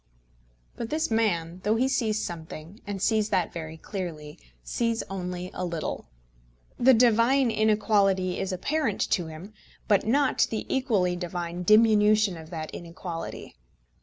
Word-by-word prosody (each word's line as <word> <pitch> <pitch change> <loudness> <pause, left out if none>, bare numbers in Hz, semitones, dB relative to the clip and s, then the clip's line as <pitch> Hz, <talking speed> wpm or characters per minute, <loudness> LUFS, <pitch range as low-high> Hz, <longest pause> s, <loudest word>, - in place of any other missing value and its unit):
But 230 - -4
this 310 -3 -1
man, 180 -6 0
though 210 +2 +2
he 250 +3 +2
sees 220 -5 0
something, 165 +3 -8
and 200 -1 -4
sees 215 +1 +1
that 180 -4 0
very 160 -1 -6
clearly, 160 -6 -6 0.2
sees 230 - -1
only 180 -1 -4
a - - -4
little. 170 -3 -4 0.7
The 255 +1 +6
divine 235 +2 +4
inequality 205 -4 +2
is 195 - -2
apparent 230 - -1
to 175 -3 +1
him, 165 +7 -10 0.3
but 205 -2 +3
not 270 +4 +2
the 220 - -3
equally 210 -10 +1
divine 175 0 -4
diminution 215 -1 +5
of 160 -1 -10
that 160 -3 -5
inequality. 170 0 -7
195 Hz, 135 wpm, -27 LUFS, 175-225 Hz, 0.7 s, The